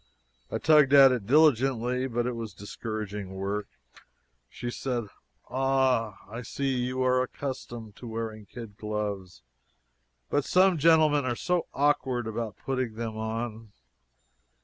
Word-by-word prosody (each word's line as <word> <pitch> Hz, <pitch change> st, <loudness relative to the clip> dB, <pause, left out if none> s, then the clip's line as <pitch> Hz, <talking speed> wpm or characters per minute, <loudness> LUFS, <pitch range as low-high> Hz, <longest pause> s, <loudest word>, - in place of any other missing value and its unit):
I -, -, -2 dB
tugged 150 Hz, -3 st, +5 dB
at 135 Hz, -2 st, +9 dB
it 120 Hz, -6 st, -2 dB
diligently, 130 Hz, -3 st, +3 dB
but 120 Hz, -1 st, -1 dB
it 125 Hz, -, 0 dB
was 115 Hz, -2 st, -6 dB
discouraging 105 Hz, -2 st, -6 dB
work. 100 Hz, +2 st, -3 dB, 0.8 s
She 120 Hz, -, -5 dB
said: 120 Hz, -4 st, -3 dB, 0.4 s
"Ah! 130 Hz, -5 st, +1 dB
I 115 Hz, +4 st, -7 dB
see 135 Hz, +3 st, -2 dB
you 125 Hz, +1 st, -1 dB
are 130 Hz, 0 st, +3 dB
accustomed 120 Hz, -5 st, -6 dB
to 120 Hz, -, -9 dB
wearing 110 Hz, -2 st, -5 dB
kid 115 Hz, -3 st, -10 dB
gloves 100 Hz, -, -4 dB, 0.8 s
but 145 Hz, -, +1 dB
some 185 Hz, +1 st, +4 dB
gentlemen 155 Hz, -2 st, +5 dB
are 120 Hz, -2 st, 0 dB
so 175 Hz, +5 st, -1 dB
awkward 135 Hz, -4 st, +1 dB
about 110 Hz, -2 st, -4 dB
putting 130 Hz, -4 st, -3 dB
them 115 Hz, -1 st, -4 dB
on." 110 Hz, 0 st, -4 dB
120 Hz, 130 wpm, -28 LUFS, 110-135 Hz, 0.8 s, at